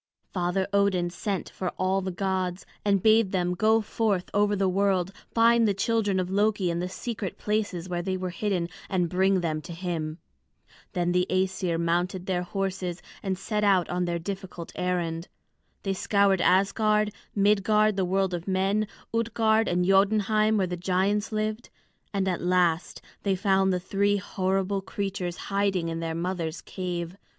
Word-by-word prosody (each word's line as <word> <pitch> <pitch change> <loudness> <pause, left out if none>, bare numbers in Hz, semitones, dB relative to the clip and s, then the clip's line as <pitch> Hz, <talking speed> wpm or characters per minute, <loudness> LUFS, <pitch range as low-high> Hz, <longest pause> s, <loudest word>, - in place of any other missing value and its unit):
Father 180 +1 0
Odin 190 -3 +2
sent 195 +2 -3
for 185 - -3
all 190 +1 +1
the 190 - -3
gods, 185 0 -2 0.2
and 200 -2 +2
bade 220 -2 +5
them 180 -2 0
go 220 +4 +3
forth 210 -3 -1
over 205 0 +3
the 195 -1 +1
world, 190 -1 +1 0.2
find 230 0 +5
the 200 - +1
children 205 -1 +1
of 185 0 -2
Loki 205 -2 +2
in 170 - -2
the 180 +1 -2
secret 215 -1 -5
places 205 -5 -2
where 175 -1 -2
they 185 +1 -2
were 185 -1 -3
hidden, 180 -1 -1 0.2
and 180 -3 +1
bring 190 0 +3
them 155 -2 -1
to 170 - -9
him. 165 -3 -3 0.8
Then 175 -2 0
the 180 +1 +2
Æsir 185 -2 0
mounted 175 +2 0
their 185 -2 0
horses 185 -1 -3 0.2
and 190 -2 -2
set 210 +2 -2
out 190 -4 +4
on 180 0 0
their 170 -1 -1
difficult 185 -1 -6
errand. 175 -2 -2 0.6
They 195 - 0
scoured 195 -1 +2
Asgard, 210 +2 +3 0.2
Midgard 210 +1 +3
the 190 - +1
world 190 0 +1
of 175 +1 -4
men, 195 +3 +1 0.3
Utgard 225 -1 +2
and 180 0 +1
Jotunheim 215 +2 +3
where 195 - +2
the 180 0 -4
giants 190 +4 0
lived. 215 +1 -2 0.4
And 195 -2 0
at 180 -2 -1
last 175 -2 +1 0.2
they 195 -2 +1
found 190 0 +2
the 180 - +1
three 200 +2 +1
horrible 195 0 -1
creatures 190 -3 -4
hiding 195 -4 0
in 165 0 -3
their 165 -1 -3
mother's 170 -2 -3
cave. 180 -1 -5
190 Hz, 165 wpm, -27 LUFS, 180-205 Hz, 0.8 s, bade